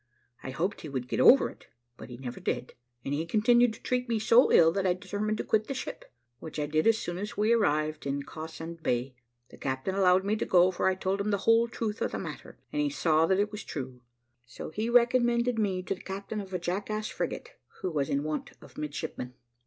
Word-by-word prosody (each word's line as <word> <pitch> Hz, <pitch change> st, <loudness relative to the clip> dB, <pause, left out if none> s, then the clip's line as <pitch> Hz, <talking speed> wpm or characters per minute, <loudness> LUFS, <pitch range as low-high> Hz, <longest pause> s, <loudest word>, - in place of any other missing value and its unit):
I -, -, -6 dB
hoped 170 Hz, +10 st, -2 dB
he 155 Hz, -, -7 dB
would 130 Hz, -3 st, -4 dB
get -, -, -2 dB
over -, -, +7 dB
it, -, -, -19 dB, 0.3 s
but -, -, -11 dB
he 120 Hz, -, -8 dB
never 125 Hz, -1 st, -7 dB
did; 125 Hz, -, -3 dB, 0.3 s
and 140 Hz, -, -2 dB
he 150 Hz, +3 st, 0 dB
continued 240 Hz, +5 st, +4 dB
to -, -, -14 dB
treat 250 Hz, -1 st, -1 dB
me 230 Hz, -, +1 dB
so 230 Hz, +3 st, +5 dB
ill, 165 Hz, -1 st, +7 dB
that 190 Hz, +2 st, 0 dB
I 180 Hz, -, +2 dB
determined 205 Hz, +3 st, -3 dB
to -, -, -2 dB
quit 215 Hz, -1 st, +1 dB
the 275 Hz, -, -3 dB
ship, -, -, -7 dB, 0.3 s
which 160 Hz, -, -8 dB
I 150 Hz, -, 0 dB
did 155 Hz, +4 st, +1 dB
as 225 Hz, -1 st, +5 dB
soon 175 Hz, -3 st, -4 dB
as 210 Hz, +4 st, -5 dB
we 215 Hz, +3 st, +3 dB
arrived 155 Hz, -8 st, +1 dB
in 140 Hz, +1 st, -2 dB
Cawsand 160 Hz, +2 st, -8 dB
Bay. 125 Hz, -3 st, -1 dB, 0.4 s
The -, -, -15 dB
captain 130 Hz, +6 st, -2 dB
allowed 190 Hz, -1 st, +4 dB
me 205 Hz, +2 st, +1 dB
to -, -, -1 dB
go, 180 Hz, 0 st, +5 dB
for 185 Hz, -, 0 dB
I 190 Hz, -, +3 dB
told 190 Hz, +1 st, -1 dB
him 205 Hz, -, -1 dB
the 200 Hz, -, +2 dB
whole 230 Hz, +1 st, +5 dB
truth 225 Hz, -2 st, -4 dB
of -, -, -1 dB
the -, -, -1 dB
matter, -, -, -8 dB, 0.2 s
and 295 Hz, -, +1 dB
he 295 Hz, -, +1 dB
saw 165 Hz, -, +2 dB
that 190 Hz, +2 st, +2 dB
it 205 Hz, +1 st, +1 dB
was 210 Hz, -1 st, -6 dB
true; 130 Hz, -4 st, -6 dB, 0.5 s
so 120 Hz, -, -8 dB
he 215 Hz, +6 st, -2 dB
recommended 240 Hz, -1 st, +3 dB
me 190 Hz, -4 st, 0 dB
to 190 Hz, -, -2 dB
the 190 Hz, -, -11 dB
captain 200 Hz, +2 st, -5 dB
of 195 Hz, -1 st, -10 dB
a 185 Hz, -, -1 dB
jackass 200 Hz, +5 st, -3 dB
frigate, -, -, -4 dB, 0.3 s
who 185 Hz, -, -2 dB
was 145 Hz, -3 st, -1 dB
in 140 Hz, +1 st, 0 dB
want 155 Hz, 0 st, -4 dB
of -, -, -13 dB
midshipmen." 145 Hz, -4 st, -5 dB
190 Hz, 235 wpm, -29 LUFS, 155-215 Hz, 0.5 s, over